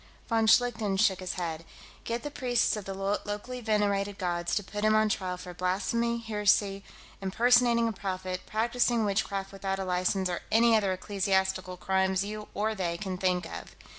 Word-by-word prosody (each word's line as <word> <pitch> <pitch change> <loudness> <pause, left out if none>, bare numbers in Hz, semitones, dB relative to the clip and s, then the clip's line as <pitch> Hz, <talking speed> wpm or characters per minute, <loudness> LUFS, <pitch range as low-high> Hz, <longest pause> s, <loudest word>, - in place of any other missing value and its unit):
Von 225 -1 +2
Schlichten 220 -4 +3
shook 190 -2 +3
his 185 -1 -4
head. 165 -3 -4 0.4
"Get 235 +1 -3
the 295 - -5
priests 245 -5 +1
of 210 -2 -6
the 195 - -5
locally 205 +5 -3
venerated 205 -2 0
gods 175 -2 -1
to 205 - 0
put 205 +2 -5
him 215 0 +4
on 215 0 +3
trial 185 -3 -2
for 180 0 -9
blasphemy, 205 +6 0
heresy, 210 -3 +1 0.4
impersonating 235 +4 +4
a - - 0
prophet, 185 -2 -4
practicing 235 +1 +1
witchcraft 195 -1 -1
without 195 -1 -3
a 195 - -3
license, 185 +1 0
or 175 -1 -3
any 230 +1 +5
other 200 -3 +2
ecclesiastical 190 -1 -1
crimes 190 +1 +1
you 210 0 -6
or 215 +2 0
they 175 -5 -2
can 185 -1 -4
think 180 -2 +1
of. - - -8
200 Hz, 170 wpm, -29 LUFS, 185-220 Hz, 0.4 s, any